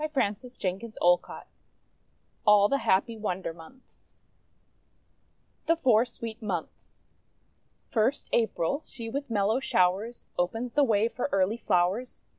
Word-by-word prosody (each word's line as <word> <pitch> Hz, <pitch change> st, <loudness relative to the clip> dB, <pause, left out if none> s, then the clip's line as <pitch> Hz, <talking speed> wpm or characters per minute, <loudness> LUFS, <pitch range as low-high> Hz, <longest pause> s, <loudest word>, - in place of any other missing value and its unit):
HANS 210 Hz, -6 st, +1 dB
CHRISTIAN 195 Hz, -7 st, -4 dB
ANDERSEN 230 Hz, -2 st, -9 dB
(adapted) 175 Hz, 0 st, +2 dB, 1.0 s
ALL 210 Hz, -2 st, +6 dB
THE 275 Hz, -, +1 dB
HAPPY 225 Hz, +2 st, +1 dB
WONDER 190 Hz, -5 st, -3 dB
MONTHS 170 Hz, +11 st, -17 dB, 1.5 s
THE 330 Hz, -, +4 dB
FOUR 245 Hz, -8 st, +4 dB
SWEET 230 Hz, -2 st, -8 dB
MONTHS 185 Hz, -6 st, -6 dB, 0.8 s
First, 230 Hz, +5 st, 0 dB
April., 225 Hz, -, +1 dB
she 225 Hz, -2 st, -7 dB
with 280 Hz, +2 st, -4 dB
mellow 215 Hz, +2 st, +1 dB
showers 200 Hz, 0 st, 0 dB
Opens 225 Hz, +7 st, -1 dB
the 295 Hz, -, +4 dB
way 220 Hz, -4 st, +3 dB
for 245 Hz, +4 st, -3 dB
early 195 Hz, +3 st, +2 dB
flowers. 195 Hz, +4 st, 0 dB
220 Hz, 120 wpm, -28 LUFS, 190-245 Hz, 1.5 s, ALL